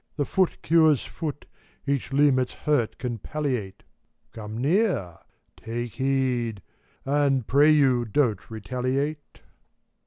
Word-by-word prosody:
The 145 Hz, -, -1 dB
foot 190 Hz, +3 st, 0 dB
cures 160 Hz, -4 st, +4 dB
foot, 150 Hz, -3 st, -6 dB, 0.4 s
each 140 Hz, -1 st, -1 dB
limb 140 Hz, -1 st, +4 dB
its 125 Hz, -, -2 dB
hurt 145 Hz, -7 st, 0 dB
can 120 Hz, -3 st, -4 dB
palliate; 125 Hz, -8 st, -4 dB, 0.5 s
Gome 110 Hz, 0 st, -7 dB
near! 145 Hz, -, 0 dB, 0.4 s
Take 120 Hz, +1 st, -5 dB
heed! 130 Hz, -6 st, -1 dB, 0.4 s
and, 135 Hz, -3 st, +1 dB
pray 145 Hz, +5 st, +4 dB
you, 135 Hz, -5 st, +4 dB
don't 115 Hz, -3 st, 0 dB
retaliate 130 Hz, +7 st, -3 dB
135 Hz, 115 wpm, -25 LUFS, 120-145 Hz, 0.5 s, cures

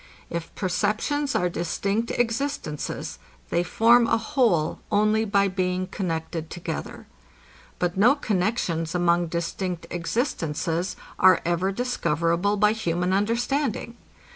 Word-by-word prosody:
If 170 Hz, -1 st, -4 dB
perceptions 215 Hz, +10 st, 0 dB
are 180 Hz, -, +2 dB
distinct 200 Hz, +6 st, -1 dB
existences, 240 Hz, -, -2 dB, 0.3 s
they 170 Hz, -, +2 dB
form 230 Hz, +6 st, +4 dB
a -, -, +3 dB
whole 225 Hz, -, +1 dB
only 215 Hz, +1 st, +3 dB
by 200 Hz, -1 st, +3 dB
being 185 Hz, -1 st, -1 dB
connected 165 Hz, -3 st, -4 dB
together. 170 Hz, -2 st, -6 dB, 0.7 s
But 180 Hz, 0 st, -1 dB
no 240 Hz, +8 st, +6 dB
connexions 180 Hz, -, -1 dB
among 175 Hz, 0 st, +2 dB
distinct 170 Hz, +1 st, -3 dB
existences 175 Hz, -, -1 dB, 0.2 s
are 185 Hz, 0 st, +7 dB
ever 175 Hz, +3 st, +1 dB
discoverable 180 Hz, -, 0 dB
by 210 Hz, +1 st, +4 dB
human 180 Hz, -4 st, -1 dB
understanding. 235 Hz, +4 st, 0 dB
185 Hz, 110 wpm, -25 LUFS, 170-225 Hz, 0.7 s, are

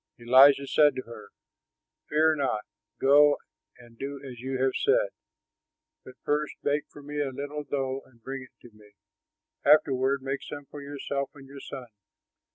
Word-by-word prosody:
Elijah 135 Hz, +4 st, +6 dB
said 150 Hz, +1 st, +4 dB
to 130 Hz, -, -4 dB
her, 110 Hz, -3 st, -11 dB, 0.8 s
"Fear 155 Hz, +1 st, +3 dB
not; 130 Hz, -7 st, -1 dB, 0.3 s
go 145 Hz, +2 st, +6 dB, 0.4 s
and 120 Hz, -1 st, -18 dB
do 140 Hz, +1 st, -5 dB
as 125 Hz, -2 st, -9 dB
you 130 Hz, +1 st, -4 dB
have 130 Hz, 0 st, +2 dB
said, -, -, +2 dB, 0.9 s
but 130 Hz, -, -13 dB
first 150 Hz, 0 st, -1 dB
bake 145 Hz, +1 st, 0 dB
for 145 Hz, -, -13 dB
me 145 Hz, +1 st, -3 dB
a 140 Hz, -, -1 dB
little 145 Hz, +3 st, -5 dB
dough 135 Hz, -2 st, -2 dB
and 125 Hz, -3 st, -24 dB
bring 135 Hz, +1 st, -5 dB
it 125 Hz, -1 st, -15 dB
to 110 Hz, -, -21 dB
me. 105 Hz, -1 st, -19 dB, 0.7 s
Afterward 135 Hz, -2 st, +3 dB
make 135 Hz, +1 st, -3 dB
some 145 Hz, -1 st, -8 dB
for 145 Hz, +1 st, -10 dB
yourself 140 Hz, -1 st, -4 dB
and 135 Hz, -1 st, -13 dB
your 140 Hz, +1 st, -11 dB
son. 130 Hz, -, -8 dB
140 Hz, 165 wpm, -27 LUFS, 130-145 Hz, 0.9 s, Elijah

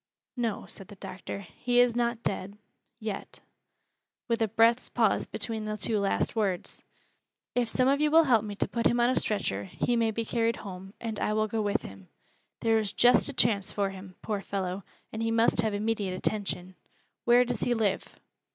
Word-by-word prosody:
"No," 235 Hz, -4 st, -2 dB
said 195 Hz, -, -7 dB
the 205 Hz, -, -12 dB
doctor, 190 Hz, +1 st, -7 dB
"he 245 Hz, +7 st, 0 dB
is 245 Hz, -1 st, +4 dB
not 235 Hz, -1 st, 0 dB
dead 200 Hz, +1 st, -3 dB, 0.4 s
yet"; 215 Hz, -3 st, -6 dB, 0.9 s
with 230 Hz, -1 st, 0 dB
a 225 Hz, -, +3 dB
breath's 225 Hz, +3 st, +3 dB
pause -, -, +2 dB
between 220 Hz, -2 st, -3 dB
the 215 Hz, 0 st, -3 dB
two 215 Hz, 0 st, 0 dB
last 200 Hz, +3 st, 0 dB
words. 195 Hz, -5 st, -1 dB, 0.7 s
"If 245 Hz, -2 st, +1 dB
some 255 Hz, +2 st, +2 dB
of 280 Hz, +2 st, +3 dB
you 300 Hz, -, +4 dB
will 325 Hz, +2 st, +6 dB
help 240 Hz, -7 st, +3 dB
me 205 Hz, -1 st, -5 dB
to -, -, 0 dB
put 235 Hz, -, +1 dB
him 240 Hz, -, +1 dB
on 240 Hz, +1 st, +4 dB
a -, -, 0 dB
stretcher, 100 Hz, -, 0 dB
he 240 Hz, -, -1 dB
may 230 Hz, -1 st, +2 dB
be 225 Hz, +1 st, -2 dB
carried 230 Hz, 0 st, +1 dB
home, 190 Hz, +1 st, -8 dB
and 220 Hz, -2 st, -4 dB
I 210 Hz, -, 0 dB
will 215 Hz, 0 st, +1 dB
go 220 Hz, +1 st, -1 dB
with 205 Hz, -1 st, 0 dB
him. 95 Hz, -1 st, -11 dB, 0.5 s
There 225 Hz, -1 st, +3 dB
is 210 Hz, -2 st, -2 dB
just 245 Hz, +3 st, +5 dB
a -, -, -4 dB
chance 210 Hz, -6 st, +2 dB
for 200 Hz, -1 st, -1 dB
him, 190 Hz, -1 st, -11 dB
poor 210 Hz, -3 st, -2 dB
fellow, 190 Hz, -1 st, -3 dB, 0.3 s
and 220 Hz, -, -3 dB
he 225 Hz, -, 0 dB
must 225 Hz, 0 st, +3 dB
have 220 Hz, -2 st, -1 dB
immediate 205 Hz, -3 st, -1 dB
attention. 190 Hz, -2 st, -2 dB, 0.5 s
Where 245 Hz, +1 st, +6 dB
does 245 Hz, -3 st, -3 dB
he 240 Hz, -, +1 dB
live?" 210 Hz, -4 st, -1 dB
220 Hz, 195 wpm, -29 LUFS, 200-235 Hz, 0.9 s, will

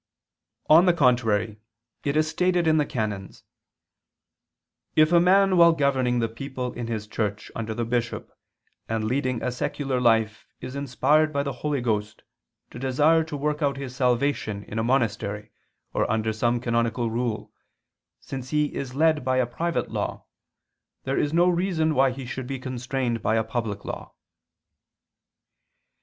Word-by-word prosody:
On 165 Hz, +4 st, +7 dB
the 175 Hz, -, +6 dB
contrary, 115 Hz, -6 st, +2 dB, 0.4 s
It 145 Hz, +1 st, 0 dB
is 155 Hz, 0 st, +3 dB
stated 180 Hz, +1 st, +1 dB
(XIX, -, -, +4 dB
qu. 155 Hz, -, +3 dB
ii, -, -, 0 dB
cap. 110 Hz, -3 st, -1 dB
Duce): 95 Hz, -, -14 dB, 1.5 s
"If 155 Hz, +1 st, +5 dB
a 170 Hz, -, +6 dB
man 190 Hz, +1 st, +4 dB
while 170 Hz, -1 st, +7 dB
governing 135 Hz, -5 st, +1 dB
the 115 Hz, -1 st, +1 dB
people 125 Hz, +2 st, -5 dB
in 120 Hz, -1 st, -5 dB
his 110 Hz, -2 st, -3 dB
church 105 Hz, -1 st, -3 dB
under 110 Hz, -1 st, -4 dB
the 120 Hz, 0 st, -2 dB
bishop 120 Hz, 0 st, -2 dB, 0.6 s
and 110 Hz, -1 st, -1 dB
leading 130 Hz, +1 st, -1 dB
a -, -, 0 dB
secular 130 Hz, +1 st, -2 dB
life 110 Hz, -2 st, +2 dB
is 130 Hz, -, -7 dB
inspired 145 Hz, +3 st, +2 dB
by 140 Hz, -1 st, 0 dB
the 140 Hz, -1 st, -3 dB
Holy 145 Hz, +1 st, -2 dB
Ghost 105 Hz, -3 st, -2 dB, 0.5 s
to -, -, -9 dB
desire 150 Hz, +5 st, +3 dB
to 155 Hz, -2 st, -6 dB
work 150 Hz, +2 st, -1 dB
out 140 Hz, -2 st, +1 dB
his 135 Hz, -2 st, -6 dB
salvation 125 Hz, -5 st, 0 dB
in 110 Hz, -, -5 dB
a -, -, 0 dB
monastery 110 Hz, -4 st, -1 dB, 0.4 s
or -, -, 0 dB
under 110 Hz, 0 st, 0 dB
some 120 Hz, +2 st, +1 dB
canonical 115 Hz, -1 st, 0 dB
rule, 115 Hz, -1 st, -3 dB, 0.7 s
since 130 Hz, -1 st, -7 dB
he 150 Hz, 0 st, 0 dB
is 130 Hz, -2 st, -5 dB
led 155 Hz, 0 st, +3 dB
by 130 Hz, 0 st, +1 dB
a 130 Hz, -, +3 dB
private 165 Hz, +8 st, -2 dB
law, -, -, -3 dB, 0.8 s
there 135 Hz, +1 st, -1 dB
is 145 Hz, -, 0 dB
no 170 Hz, +2 st, +4 dB
reason 175 Hz, -3 st, +1 dB
why 135 Hz, -1 st, +4 dB
he 130 Hz, +1 st, -6 dB
should 130 Hz, 0 st, -5 dB
be 135 Hz, 0 st, -3 dB
constrained 125 Hz, -2 st, -3 dB
by 110 Hz, -, +1 dB
a 110 Hz, -, +2 dB
public 110 Hz, -3 st, -4 dB
law." -, -, -7 dB
130 Hz, 165 wpm, -25 LUFS, 115-150 Hz, 1.5 s, On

